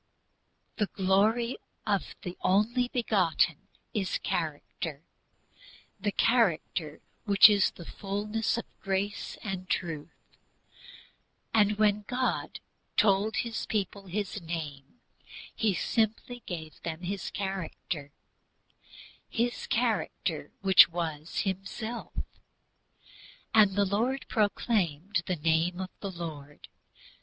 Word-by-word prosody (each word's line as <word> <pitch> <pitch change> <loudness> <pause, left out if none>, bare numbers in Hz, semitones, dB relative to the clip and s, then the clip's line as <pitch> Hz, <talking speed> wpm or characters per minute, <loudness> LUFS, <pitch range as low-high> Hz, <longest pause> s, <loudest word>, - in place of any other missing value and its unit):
"The 210 - +1
Glory 210 +7 +2 0.3
of 200 -3 0
the 180 0 -5
Only 230 +6 +3
Begotten" 185 - +1 0.3
is 195 -4 0
character, 155 -1 -3 1.0
the 205 +1 0
character 175 -10 +1 0.2
which 200 -1 +9
is 205 -2 +4
"fullness 205 +6 -2
of 235 - -3 0.2
grace 195 +1 -2
and 190 -3 -4
truth." 165 -4 -4 1.1
And 210 -1 +4
when 210 -1 +3
God 255 0 -1 0.4
told 210 +1 +4
His 230 -2 -2
people 200 -2 -2
His 205 +2 -3
name, 160 - -6 0.5
He 215 -4 +1
simply 225 +4 0
gave 160 -3 -6
them 165 0 -4
His 195 +1 -3
character, 180 -6 -4 1.2
His 240 - -1
character - - -1
which 190 -3 +8
was 165 -2 -3
Himself: 200 +5 -4 1.4
"And 205 -3 +6
the 200 0 +3
Lord 235 +8 0
proclaimed 200 -5 +1
the 185 - +1
name 165 +3 +1
of 185 -1 -4
the 200 - -4
Lord 150 -5 -8
195 Hz, 100 wpm, -29 LUFS, 170-215 Hz, 1.4 s, which